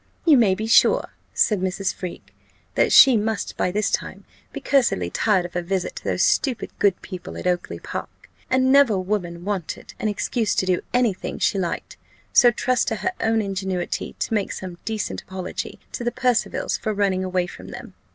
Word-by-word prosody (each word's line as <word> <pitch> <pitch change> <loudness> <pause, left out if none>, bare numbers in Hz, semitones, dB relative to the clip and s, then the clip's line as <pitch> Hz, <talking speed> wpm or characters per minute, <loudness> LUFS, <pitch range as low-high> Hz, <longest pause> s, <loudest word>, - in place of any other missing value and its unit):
"You 320 -4 +7
may 215 -7 +4
be 215 - -4
sure," 225 - +4 0.2
said 210 -4 +2
Mrs. 190 +1 -1
Freke, 180 -2 -8 0.4
"that - - +2
she 265 -3 +8
must 220 -1 -1
by - - 0
this 210 +3 0
time - - -3 0.3
be - - -6
cursedly 235 - +1
tired 195 -5 +2
of 175 - -8
her 175 - -1
visit 185 +1 -2
to - - -7
those - - 0
stupid 260 -5 +1
good 195 -3 +3
people 185 -3 -8
at - - -7
Oakly 180 -1 -1
park, - - -8 0.2
and 260 0 +3
never 275 -7 +5
woman 180 -3 -3
wanted 195 -5 -4
an - - -1
excuse 215 +1 -1
to - - +1
do 185 -1 +1
any 245 -4 +3
thing - - -6
she 195 - +1
liked: 175 -2 -4 0.4
so 245 - +7
trust 250 +2 0
to 225 - 0
her 370 - -1
own 225 -1 +1
ingenuity 190 -2 -3
to - - -2
make 205 -3 0
some 180 -2 -7
decent 220 -2 -3
apology 185 -1 -6
to 240 - -5
the 240 - 0
Percivals 245 -1 0
for 215 -1 -2
running 195 -2 +1
away 185 -1 0
from 175 - -11
them. - - -9
200 Hz, 190 wpm, -23 LUFS, 185-225 Hz, 0.4 s, she